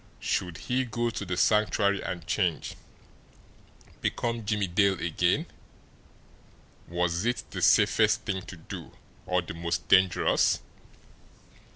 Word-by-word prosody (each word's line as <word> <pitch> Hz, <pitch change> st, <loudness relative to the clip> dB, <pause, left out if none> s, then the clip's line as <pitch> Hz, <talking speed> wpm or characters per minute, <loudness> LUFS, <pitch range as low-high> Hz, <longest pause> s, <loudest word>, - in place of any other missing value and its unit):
Should 90 Hz, -3 st, -2 dB
he 130 Hz, +1 st, -1 dB
go 120 Hz, -1 st, -2 dB
to 105 Hz, -, -5 dB
the 90 Hz, -1 st, -3 dB
Sanctuary 100 Hz, +1 st, +2 dB
and 85 Hz, -3 st, -5 dB
change 85 Hz, -1 st, -1 dB, 1.3 s
become 115 Hz, -1 st, -2 dB
Jimmie 105 Hz, -1 st, 0 dB
Dale 95 Hz, +1 st, +2 dB
again? 85 Hz, -1 st, +1 dB, 1.4 s
Was 85 Hz, +1 st, -1 dB
it 120 Hz, +1 st, -1 dB
the -, -, -5 dB
safest -, -, +4 dB
thing 95 Hz, -1 st, -2 dB
to 90 Hz, -, -9 dB
do 80 Hz, -, -9 dB, 0.3 s
or 90 Hz, -1 st, +1 dB
the 80 Hz, -, -7 dB
most 85 Hz, 0 st, -3 dB
dangerous? 95 Hz, -2 st, +4 dB
95 Hz, 115 wpm, -28 LUFS, 85-105 Hz, 1.4 s, safest